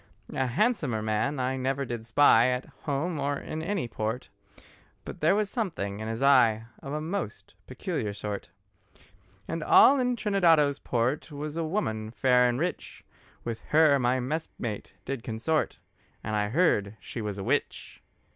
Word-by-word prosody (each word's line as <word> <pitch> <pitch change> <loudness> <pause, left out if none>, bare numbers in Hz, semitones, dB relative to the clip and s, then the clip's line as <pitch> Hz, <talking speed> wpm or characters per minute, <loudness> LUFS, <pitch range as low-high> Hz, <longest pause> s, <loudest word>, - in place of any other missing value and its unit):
A 130 - 0
handsomer 140 - 0
man 110 +6 0
I 130 +1 -1
never 135 +1 -1
did 120 -2 -6
spy, 120 -1 +5
At 125 +1 -1 0.2
home 150 +3 -1
or 140 0 -1
in 155 - -5
any 175 -5 -2
port; 110 +2 -4 0.8
But - - -8
there 160 +5 +3
was 210 0 +1
something 165 - -3
in 110 - -5
his 115 +4 -3
eye 115 -5 +5 0.2
Of 135 - -7
a 150 - -2
most 160 - -5
peculiar 105 - -3
sort. 100 0 -5 1.0
And 165 -1 -3
all 275 - +7
in 250 -1 +1
Trinidado's 170 -10 +3
port 125 +6 -1
Was 150 +1 -5
a 165 - -1
woman 135 - -2
fair 125 +1 +3
and 120 +1 -1
rich, 175 +3 -4 0.4
With 115 -1 -4
her 150 -2 +4
my 125 +1 +2
messmate 125 - -4
did 135 -3 -3
consort, 120 +8 -1 0.5
And 110 0 -2
I 105 0 0
heard 110 - +2
she 120 - -7
was 105 -2 -4
a 95 - -4
witch. - - -2
130 Hz, 160 wpm, -28 LUFS, 115-160 Hz, 1.0 s, all